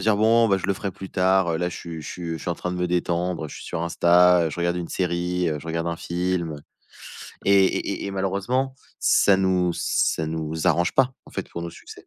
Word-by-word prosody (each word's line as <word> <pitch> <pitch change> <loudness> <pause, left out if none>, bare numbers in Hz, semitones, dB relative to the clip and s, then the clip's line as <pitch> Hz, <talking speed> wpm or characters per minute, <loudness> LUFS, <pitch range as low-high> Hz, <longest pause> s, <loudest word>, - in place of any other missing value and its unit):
se - - -3
dire: 110 - +4
«Bon, 115 +2 +4
bah, 100 - +4
je 95 - -4
le 100 - +2
ferai 100 +1 -4
plus 95 0 -10
tard, 95 -1 +2
heu, 80 - 0
là, 90 - 0
je 90 - -7
suis 85 -2 -7
je - - -9
suis 85 -2 -6
je - - -3
suis - - -6
en 85 - 0
train 90 - -4
de - - -4
me 90 0 0
détendre. 90 -1 -1
Heu, 75 - -5
je - - -10
suis - - -10
sur 85 - -4
Insta, 85 0 +4
je 75 - -7
regarde 85 0 0
une 85 -1 -4
série, 90 0 -1
heu, 75 - -2
je 80 - -11
regarde 85 0 -2
un 85 - -2
film» 85 -2 -2 0.9
et 100 0 +5
et - - 0
et 100 - -3
et - - -3
malheureusement, 100 +8 -1 0.2
ça 100 - +4
nous 90 -2 +1
ça 80 - 0
nous 80 0 -3
arrange 85 0 +2
pas, 130 -1 +3
en - - -16
fait, - - -5
pour 85 - -6
nos 85 - -5
succès. - - -13
90 Hz, 260 wpm, -24 LUFS, 85-95 Hz, 0.9 s, et